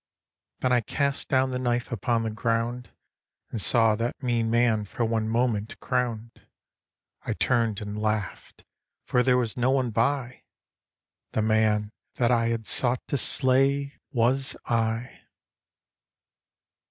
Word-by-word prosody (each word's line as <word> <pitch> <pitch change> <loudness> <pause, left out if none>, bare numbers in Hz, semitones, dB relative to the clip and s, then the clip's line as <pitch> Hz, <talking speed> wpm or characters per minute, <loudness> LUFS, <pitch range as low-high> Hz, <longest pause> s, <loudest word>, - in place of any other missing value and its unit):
Then 130 - +1
I 125 -1 +4
cast 140 +5 -1
down 130 -1 +2
the 125 - -2
knife 120 -1 -1
upon 115 +1 0
the 110 - -2
ground 115 +2 -2 0.6
And 110 - -2
saw 115 -1 +4
that 120 +4 -3
mean 120 -2 0
man 115 -2 +2
for 115 +4 -2
one 110 -1 -1
moment 115 -2 -1
crowned. 120 -3 -3 0.8
I - - -3
turned 115 -4 0
and 105 0 -5
laughed: 105 -3 -3 0.4
for 125 - +2
there 125 0 +3
was 120 -3 0
no 125 +1 +2
one 130 -3 +1
by 125 +3 -1 0.9
The 110 - +1
man 110 -1 +2 0.2
that 120 -1 +2
I 115 -1 +2
had 115 -1 -2
sought 125 +1 +1
to 140 - 0
slay 135 +2 +2
was 130 +1 +1
I. 115 +1 -1
120 Hz, 135 wpm, -26 LUFS, 110-125 Hz, 0.9 s, I